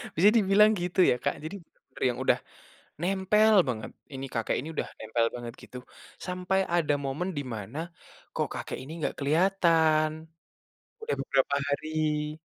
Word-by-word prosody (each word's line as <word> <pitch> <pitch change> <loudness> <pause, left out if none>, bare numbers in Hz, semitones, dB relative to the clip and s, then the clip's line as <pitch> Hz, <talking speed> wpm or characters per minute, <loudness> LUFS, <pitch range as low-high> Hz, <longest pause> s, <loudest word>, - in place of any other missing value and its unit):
Bisa 190 +6 +6
dibilang 210 0 +5
gitu 180 +1 -3
ya - - +4
Kak, - - 0
jadi 160 +6 -5
benar-benar 135 - -11
yang 120 - -3
udah, - - +4 0.6
nempel 195 +4 +3 0.2
banget, 110 -3 -3 0.2
ini 135 +1 -5
kakek 115 -2 -1
ini 150 - -7
udah - - -2
nempel 115 +1 0
banget 120 -1 -6
gitu. 125 - -9 0.5
Sampai 180 +1 -1 0.2
ada 155 -4 +2
momen 150 +8 -2
di 145 - -1
mana, 110 +7 -6 0.6
kok - - 0
kakek - - -5
ini 145 +4 -9
nggak - - -2
keliatan. 160 0 +3 0.9
Udah 455 - -2
beberapa 135 +1 +1
hari. 150 +1 -1
155 Hz, 150 wpm, -28 LUFS, 135-185 Hz, 0.9 s, Bisa